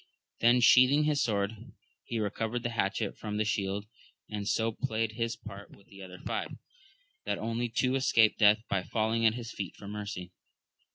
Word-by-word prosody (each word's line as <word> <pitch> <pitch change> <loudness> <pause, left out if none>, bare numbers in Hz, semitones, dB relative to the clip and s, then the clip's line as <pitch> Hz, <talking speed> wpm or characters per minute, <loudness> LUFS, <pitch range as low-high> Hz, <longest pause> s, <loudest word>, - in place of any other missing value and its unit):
Then 120 +2 +5
sheathing 130 +5 +6
his 150 -1 +1
sword, 110 0 -2 0.3
he 115 - -3
recovered 110 +3 -2
the 120 - -2
hatchet 110 -2 -1
from 105 -1 -4
the 110 - +1
shield, 100 -1 -1 0.5
and 105 -1 -4
so 115 0 +1
played 115 -2 -2
his 115 +1 -2
part 100 -1 -10
with 100 - -19
the 100 -1 -13
other 90 -1 -10
five, - - -4 0.7
that - - -1
only 115 +2 -2
two 125 +3 +1
escaped 115 -5 +3
death 105 0 +5
by 95 - 0
falling 110 +3 +1
at 110 - +2
his 115 -2 -6
feet 100 -4 -6
for 100 - -11
mercy. 100 -3 -6
110 Hz, 175 wpm, -30 LUFS, 100-115 Hz, 0.7 s, sheathing